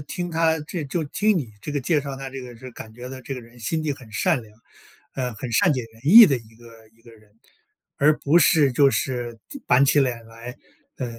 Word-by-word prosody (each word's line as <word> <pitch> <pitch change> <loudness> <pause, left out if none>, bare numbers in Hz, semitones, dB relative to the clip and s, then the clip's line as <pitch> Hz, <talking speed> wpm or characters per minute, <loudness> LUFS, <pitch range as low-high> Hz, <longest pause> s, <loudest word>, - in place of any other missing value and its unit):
听 175 +2 -5
她 160 0 +1
这 155 +2 -6
就 160 +4 -3
听 205 +8 0
你 130 -10 -4
这 150 - -6
个 145 - -1
介 150 +3 +1
绍 140 -1 -6
她 135 0 -7
这 135 0 -7
个 125 -1 -10
就 115 - -18
是 130 - -9
感 110 -2 -11
觉 125 +2 -9
到 130 0 -9
这 135 +2 -6
个 125 - -7
人 115 +1 -17
心 160 +7 -3
地 155 -2 -1
很 130 -5 -13
善 110 +4 +1
良， 105 -2 -17 0.6
呃， 125 -3 -3
很 120 +3 -7
善 150 +9 +3
解 130 -3 -2
人 115 - -20
意 220 +10 +10
的 140 -9 +2
一 115 -2 -14
个 115 -1 -17
一 115 - -28
个 120 - -16
人。 110 -2 -21 0.6
而 150 +2 +3
不 150 +4 +3
是 150 -4 +4
就 140 +2 +4
是 120 -4 -3
就 280 - -9
板 125 +2 +4
起 145 +1 +3
脸 120 -4 -1
来， 115 +3 -10 0.4
呃， 125 -3 -5
130 Hz, 265 characters per minute, -23 LUFS, 115-150 Hz, 0.6 s, 意